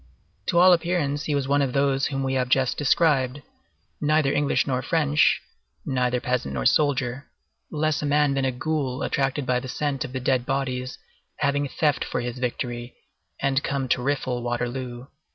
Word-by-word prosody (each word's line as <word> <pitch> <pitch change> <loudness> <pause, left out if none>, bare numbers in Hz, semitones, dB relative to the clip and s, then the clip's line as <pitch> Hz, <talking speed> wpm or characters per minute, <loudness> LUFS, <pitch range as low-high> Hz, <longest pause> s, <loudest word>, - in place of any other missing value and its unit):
To 170 - +1
all 180 +1 +8
appearance 165 -4 0
he 150 - 0
was 140 -2 -1
one 140 +1 +2
of 135 -3 0
those 135 -1 +2
whom 135 -1 -2
we 135 0 -1
have 130 -1 0
just 130 -1 +2
described,—neither 140 - 0
English 145 -1 +1
nor 130 -2 -1
French, 150 0 +2 0.5
neither 125 -1 0
peasant 125 - -2
nor 60 -2 -2
soldier, 140 -3 +1 0.4
less 155 0 0
a 150 - -1
man 145 -1 +3
than 135 0 0
a 130 - +1
ghoul 135 0 -2
attracted 135 0 -1
by 125 0 +1
the 130 - -8
scent 140 0 -2
of 125 - -7
the 130 - -2
dead 130 -1 +1
bodies 130 -1 -2 0.4
having 145 0 0
theft 145 +1 0
for - - -3
his 120 +1 -5
victory, 120 -1 -4 0.4
and 135 0 +1
come 135 -2 -2
to 125 - +2
rifle 130 -2 -1
Waterloo. 120 +1 -3
135 Hz, 170 wpm, -24 LUFS, 125-145 Hz, 0.5 s, all